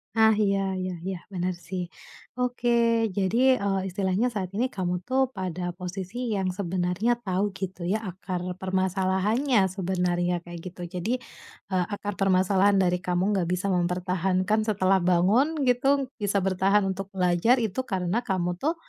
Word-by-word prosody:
Nah, 220 0 +6
iya 195 -1 +1
iya 185 -1 -3
iya, 190 -1 -2
bener 185 -1 -2
sih. 175 +1 -5 0.5
Oke, 245 -1 0 0.4
jadi, 235 +6 +3
eee, 195 -1 0
istilahnya 190 +4 0
saat 190 -4 -3
ini 240 - +2
kamu 180 -2 -2
tuh 265 0 +1
pada 185 -5 -4
posisi 195 +6 -4
yang 190 -2 0
sebenarnya 185 +4 0
tahu 195 -1 -1
gitu 190 -2 -5
ya 205 +5 0
akar 185 0 -5 0.2
permasalahannya 190 +6 +1
sebenarnya 180 -2 -1
kayak 175 0 -9
gitu, 180 0 -8
jadi, 180 +7 -2 0.6
eee, 185 -2 +1
akar 205 0 -4
permasalahan 195 +1 +3
dari 180 -1 +2
kamu 180 +3 0
nggak 175 -3 0
bisa 185 +2 -1
mempertahankan 185 +3 +1
setelah 195 -3 +2
bangun 195 - +2
gitu, 270 +2 +2
bisa 205 -3 0
bertahan 195 +1 +2
untuk 195 +1 -5
belajar 185 +7 +3
itu 225 +4 -2
karena 190 +4 -1
kamu 180 -2 -1
tuh 305 - 0
190 Hz, 145 wpm, -26 LUFS, 180-210 Hz, 0.6 s, Nah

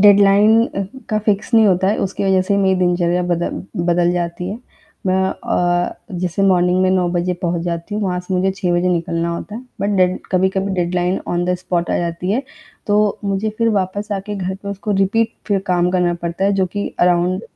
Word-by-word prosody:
Deadline 205 +2 +6 0.4
का 215 - +1
fix 210 +2 0
नहीं 225 -1 +6
होता 190 -1 +2
है 210 - +1
उसकी 195 +1 -2
वजह 190 -1 +3
से 200 +2 0
मेरी 190 -1 +3
दिनचर्या 175 0 +1
बदल 175 -1 -2 0.2
बदल 175 0 +2
जाती 175 0 -3
है। 210 - -5 0.5
मैं 185 0 +2
अ, 175 -2 0 0.3
जैसे 180 +2 -1
मॉर्निंग 180 0 +3
में 185 - +3
9 185 -2 +2
बजे 175 +1 0
पहुँच 170 -1 -1
जाती 170 +3 -4
हूँ 210 - -1
वहाँ 180 -2 -1
से 180 +1 -4
मुझे 185 +1 +2
6 180 -2 0
बजे 175 +1 +1
निकलना 170 -1 -1
होता 205 +4 -7
है। 235 - -6 0.2
बट 200 0 0
डेड 185 -1 +2
कभी-कभी 190 +1 +1
डेडलाइन 180 +1 0
ऑन 175 0 0
द 180 0 +1
स्पॉट 175 -1 -2
आ - - +1
जाती 170 +1 -3
है। 240 +7 +1 0.4
तो 210 0 +2
मुझे 200 +2 -1
फ़िर 230 0 +2
वापस 200 +1 -1
आके 200 +1 -4
घर 190 -1 -3
पे 200 +1 -9
उसको 200 +1 -4
रिपीट 225 +4 +2 0.2
फ़िर 200 -2 +2
काम 180 -1 +2
करना 180 -1 +1
पड़ता 170 +2 -2
है। 200 - +3
जो 190 -1 +1
कि 205 +3 -4
अराउंड 180 +2 +2
185 Hz, 205 wpm, -18 LUFS, 175-200 Hz, 0.5 s, डेडलाइन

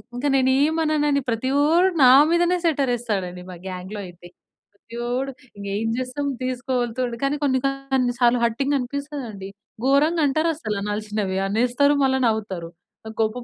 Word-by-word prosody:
ఇంక 245 - -4
నేనేమననని 295 +2 +2
ప్రతివోడు 285 +9 +2 0.2
నా 250 - +8 0.2
మీదనే 350 +1 +3
సెట్టర్ 280 -6 +1
వేస్తాడు 215 -6 -2
అండి 180 0 -10
మా 175 - -9
గ్యాంగ్‌‌లో 190 +3 -6
అయితే. 175 0 -13 0.5
ప్రతివోడు 240 +5 -4 0.5
ఏం 225 +1 -2
చేస్తాం 255 +3 -3 0.2
తీసుకోగలుగుతాడు. 250 -1 -2
కానీ 275 +2 +1
కొన్ని 260 -2 +2
కొన్ని 270 -2 -1
సార్లు 240 0 +4
హర్టింగ్ 270 +5 0
అనిపిస్తది 280 +2 -5
అండి. 195 -1 -8 0.4
గోరంగా 300 +4 +3
అంటారు 315 +4 +1
అసలు 215 -10 -3
అనాల్సినవి. 210 -2 -2
అనేస్తారు 250 +7 +2
మల్ల 265 0 +2
నవ్వుతారు. 195 -6 -3 0.4
నాకు 220 0 -9
కోపం 230 +3 -1
255 Hz, 140 wpm, -23 LUFS, 220-280 Hz, 0.5 s, నా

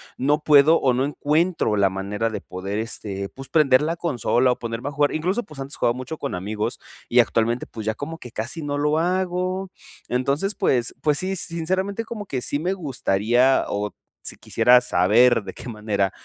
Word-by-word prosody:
no 145 +4 +1
puedo 150 +2 +6
o 130 -2 +2
no 130 +2 +1
encuentro 150 -3 +1
la 100 -2 +3
manera 100 +4 -2
de 110 - -4
poder, 95 +3 -5
este, 100 -3 -4
pues 135 0 -11
prender 140 -4 +4
la 165 +3 -1
consola 130 -6 +1
o - - -2
ponerme 115 +3 -4
a - - -7
jugar. 145 0 +1
Incluso 185 +9 -1
pues 155 - -13
antes 135 +1 -6
jugaba 120 0 +1
mucho 140 +5 -6
con - - -3
amigos, 105 +4 -3 0.3
y 120 - +4
actualmente 115 +1 +2
pues 110 - -8
ya 110 - 0
como 160 +3 -6
que 125 - -9
casi 120 +10 -4
no 145 -1 -2
lo 150 +2 +1
hago. 185 +1 -1 0.4
Entonces 140 +11 0
pues 125 - +1
pues 150 -1 +2
sí, 190 +1 -1
sinceramente 190 +6 -2
como 215 -3 -7
que 130 -2 -3
sí 145 - 0
me 180 +4 -1
gustaría, 125 - +1
o 105 0 -2 0.3
si - - -4
quisiera 125 0 +4
saber 115 +6 +4
de 95 - -7
qué - - -9
manera, 105 -3 -1
135 Hz, 190 wpm, -23 LUFS, 115-165 Hz, 0.4 s, puedo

